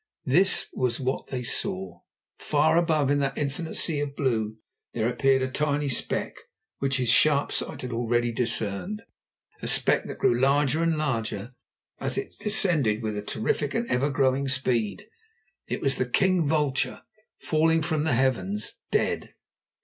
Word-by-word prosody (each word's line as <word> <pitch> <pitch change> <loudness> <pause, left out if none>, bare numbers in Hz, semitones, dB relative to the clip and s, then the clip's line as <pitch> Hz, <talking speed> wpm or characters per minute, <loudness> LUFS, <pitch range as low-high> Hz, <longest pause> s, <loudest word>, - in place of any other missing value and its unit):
This 180 +9 +3
was 125 -2 -1
what 130 0 -2
they 125 -2 -4
saw. 95 -6 -1 0.4
Far, 155 +1 +2
far - - +3
above 155 -5 +2
in 145 - +2
that 135 -1 -1
infinite 150 +3 -3
sea 155 -3 +1
of 145 -1 -3
blue 110 -6 -1 0.4
there 115 -1 0
appeared 130 +2 +2
a - - 0
tiny 145 +1 -1
speck, 125 - -2 0.5
which 135 -1 0
his 125 -2 -1
sharp 145 +3 +4
sight - - -3
had 125 - -5
already 120 0 0
discerned, 115 - -1 0.6
a - - -4
speck - - +3
that - - -7
grew 120 - +3
larger 140 +3 +2
and 165 -1 +1
larger 115 -6 -2 0.5
as - - -2
it - - -4
descended 155 - +2
with 105 -1 -3
terrific 145 +6 -1
and 235 +1 -1
ever 130 +4 +1
growing 135 -1 +1
speed. 120 -7 -1 0.6
_It - - -3
was 135 -2 +1
the 125 - -1
king 185 +2 +2
vulture 145 -3 0 0.4
falling 160 +1 +2
from 155 -2 0
the 155 -6 +1
heavens—dead! 110 -5 -1
135 Hz, 155 wpm, -26 LUFS, 120-150 Hz, 0.6 s, sharp